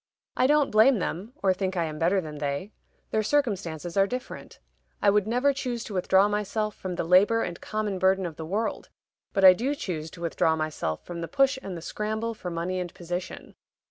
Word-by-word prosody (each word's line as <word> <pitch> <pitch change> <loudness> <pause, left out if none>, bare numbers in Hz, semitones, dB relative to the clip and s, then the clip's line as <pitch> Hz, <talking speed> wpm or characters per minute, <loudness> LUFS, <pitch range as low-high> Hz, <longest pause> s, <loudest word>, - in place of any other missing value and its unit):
I 255 - +3
don't 295 -1 +3
blame 220 +4 +6
them, 195 +5 -4
or 190 -1 +4
think 190 0 -3
I 170 - +2
am 155 -1 -5
better 175 +4 +3
than 155 -4 -7
they; 145 +8 -3 0.4
their 220 - +2
circumstances 195 - -1
are 195 0 +4
different. 250 +4 -7 0.4
I 200 - +4
would 210 0 +2
never 250 +5 +2
choose 250 -4 -3
to 215 - -8
withdraw 190 +1 +4
myself 210 +1 -1
from 185 -2 -5
the - - -1
labor 195 +7 +4
and 175 -1 -5
common 215 -3 -2
burden 190 0 +3
of 165 -3 -5
the 160 - -7
world; 205 +8 -3 0.4
but 195 -1 +3
I 185 - +11
do 255 +9 -1
choose 165 - -4
to 170 - -13
withdraw 160 -1 +1
myself 155 - -3
from 170 -1 -6
the 165 - -3
push 275 -1 +2
and 190 -6 -6
the 165 - -9
scramble 220 +4 -3
for 185 -4 -6
money 175 +2 -2
and 180 -1 -4
position. 175 +1 -6
190 Hz, 205 wpm, -27 LUFS, 170-220 Hz, 0.4 s, I